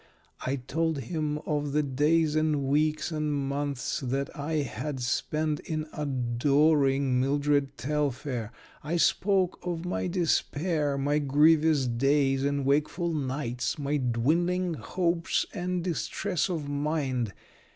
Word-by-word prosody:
I 130 - 0
told 160 +5 -1
him 150 +3 -2
of 145 -2 -1
the 150 0 +2
days 150 +3 +2
and 155 -2 +1
weeks 155 +3 +1
and 155 -1 -1
months 140 0 -2
that 135 0 -3
I 145 +3 -4
had 145 -1 -4
spent 150 +4 -1
in 155 -1 -3
adoring 135 0 +2
Mildred 140 0 +1
Telfair. 135 -5 -2 0.3
I 160 +4 -1
spoke 190 +1 +2
of 175 -1 -4
my 180 - -1
despair, 165 -4 0
my 145 +2 +1
grievous 150 0 +4
days 135 +2 +2
and 140 -1 0
wakeful 155 +5 +1
nights, 130 -4 -2
my 145 0 -1
dwindling 165 +9 +1
hopes 170 +1 0
and 180 -3 -2
distress 175 0 -1
of 160 -5 -3
mind. 140 -6 -1
150 Hz, 120 wpm, -28 LUFS, 135-160 Hz, 0.3 s, grievous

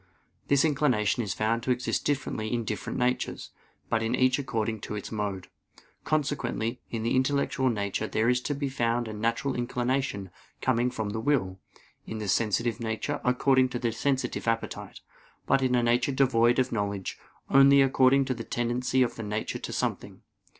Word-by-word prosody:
This 140 +2 +4
inclination 130 -8 +2
is 105 -5 -3
found 115 +2 0
to 125 - -5
exist 125 0 0
differently 130 -6 -1
in 120 -1 0
different 105 +1 -4
natures; 125 0 -1 0.4
but 115 - 0
in 115 +2 0
each 130 +1 +3
according 115 -5 -2
to 105 - -6
its 105 - -6
mode. 105 -4 -3 0.6
Consequently, 130 -6 -1
in 115 -1 -3
the 115 - +1
intellectual 130 0 +1
nature 105 -1 -2
there 110 +2 0
is 125 0 +3
to 145 - -2
be 140 0 -2
found 120 -2 0
a 110 - -5
natural 115 +5 -1
inclination 120 -4 -2 0.3
coming 125 -1 +1
from 110 -4 -3
the 110 - -3
will; 110 -8 0 0.5
in 110 - -5
the 105 -1 -4
sensitive 115 +3 +1
nature, 115 +6 -3
according 130 +1 +3
to 125 - -3
the 120 -1 -1
sensitive 130 +2 -1
appetite; 115 0 -3 0.4
but 135 - +3
in 130 -1 +2
a 120 - +2
nature 120 +3 +2
devoid 120 -3 +3
of 130 - +1
knowledge, 100 -3 -3 0.3
only 135 +1 +7
according 135 0 +4
to 130 - -1
the 115 -2 -6
tendency 125 +2 0
of 120 - -3
the - - -4
nature 105 +1 -3
to - - -6
something. - - -3
120 Hz, 175 wpm, -28 LUFS, 110-130 Hz, 0.6 s, only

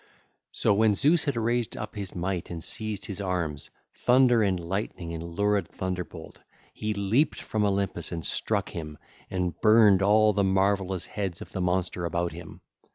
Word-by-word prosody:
So - - +2
when 105 0 +3
Zeus 155 - +3
had 140 -3 0
raised 120 +1 0
up 110 - -6
his 100 -3 -6
might 90 0 -3
and 85 -2 -6
seized 110 -2 -2
his 100 0 -5
arms, 85 -6 -3 0.2
thunder 125 -2 +4
and 95 -4 +1
lightning 85 -1 -4
and 80 - -5
lurid 100 +4 0
thunderbolt, 90 -3 -6 0.3
he 110 - -3
leaped 100 +9 +1
from 110 -1 -2
Olympus 100 -4 -1
and 85 -2 -4
struck - - -1
him, 75 -3 -7 0.3
and 90 -3 -3
burned 110 -3 +6
all 105 +2 +5
the 100 0 +1
marvellous 95 -1 +1
heads 95 -5 -4
of - - -10
the 95 - -3
monster 90 0 0
about 85 0 -1
him. - - -10
95 Hz, 165 wpm, -27 LUFS, 90-110 Hz, 0.3 s, burned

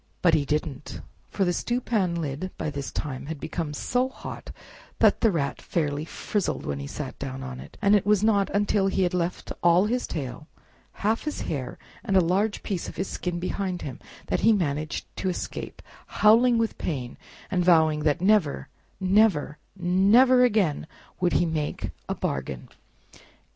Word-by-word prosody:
But 170 -2 +5
he 145 - +3
didn't! 150 -1 -3 0.3
for 195 - 0
the 175 - +1
stewpan 220 -6 0
lid 155 +2 -3
by 155 - -3
this 140 -1 -5
time 140 -2 -4
had 160 -2 -5
become 160 0 -4
so 250 - 0
hot - - -9 0.5
that - - +4
the 225 - +5
Rat 145 -7 -2
fairly 150 -2 -1
frizzled 200 +4 -2
when 70 -1 -3
he 70 - -5
sat 135 - -6
down 135 -1 -5
on 130 -1 -6
it; - - -12
and 200 +1 +6
it 205 - +3
was 210 0 +3
not 205 -3 +3
until 205 -1 +1
he 190 0 +1
had 180 - 0
left 180 0 -2
all 175 +3 +5
his 245 +3 -1
tail, 140 -1 -5 0.6
half 220 +2 +2
his 300 - -3
hair, 135 -5 -4 0.3
and 195 -5 +2
a - - +8
large 190 +5 +1
piece 190 -4 -3
of - - -10
his 190 - -2
skin 180 -1 -3
behind 185 0 -3
him, 130 -3 -6 0.3
that - - 0
he 225 +3 +5
managed 155 -5 -1
to 190 - -1
escape, 180 - -5 0.2
howling 230 +3 +5
with 225 -2 -1
pain, 130 -7 -3 0.4
and 180 -2 +2
vowing 160 -3 +4
that 150 +2 +1
never, 190 -6 +2 0.3
never, 185 -6 +3 0.2
never 200 +8 +5
again 200 -11 +2 0.3
would 180 -1 +1
he - - +3
make 155 -3 -2 0.2
a - - -1
bargain! 65 -1 -4
175 Hz, 175 wpm, -26 LUFS, 150-205 Hz, 0.6 s, a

